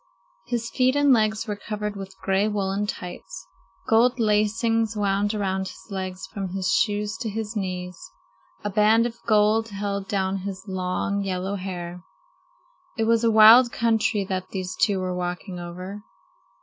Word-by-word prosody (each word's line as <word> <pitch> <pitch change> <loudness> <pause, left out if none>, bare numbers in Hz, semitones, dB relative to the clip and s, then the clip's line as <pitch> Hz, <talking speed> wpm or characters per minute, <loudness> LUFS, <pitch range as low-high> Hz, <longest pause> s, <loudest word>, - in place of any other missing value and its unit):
His 230 -1 -2
feet 255 0 +2
and 285 -1 +5
legs 215 -1 +1
were 210 -3 -3
covered 210 0 -5
with 195 -1 -8
gray 195 +2 +2
woolen 200 -1 -1
tights. 175 - -7 0.4
Gold 240 +3 +4
lacings 220 +1 +1
wound 205 +1 +1
around 190 -2 -1
his 205 - -12
legs 185 -1 -4
from 195 -4 -6
his 190 -1 0
shoes 210 0 +1
to 230 -2 -3
his 220 +1 -4
knees. 180 -3 -4 0.6
A 205 - -2
band 215 +3 +4
of 235 -1 -5
gold 215 +1 +3
held 200 -1 -3
down 195 -1 -1
his 195 0 -6
long, 190 +1 -2
yellow 190 0 -2
hair. 180 -2 -5 1.0
It 225 - +1
was 230 +1 +2
a 230 - +4
wild 225 +3 +8
country 220 -3 +1
that 185 -1 -4
these 185 -1 -4
two 200 -3 +2
were 185 -1 -2
walking 180 +1 -4
over. 180 +4 -7
205 Hz, 155 wpm, -24 LUFS, 190-220 Hz, 1.0 s, wild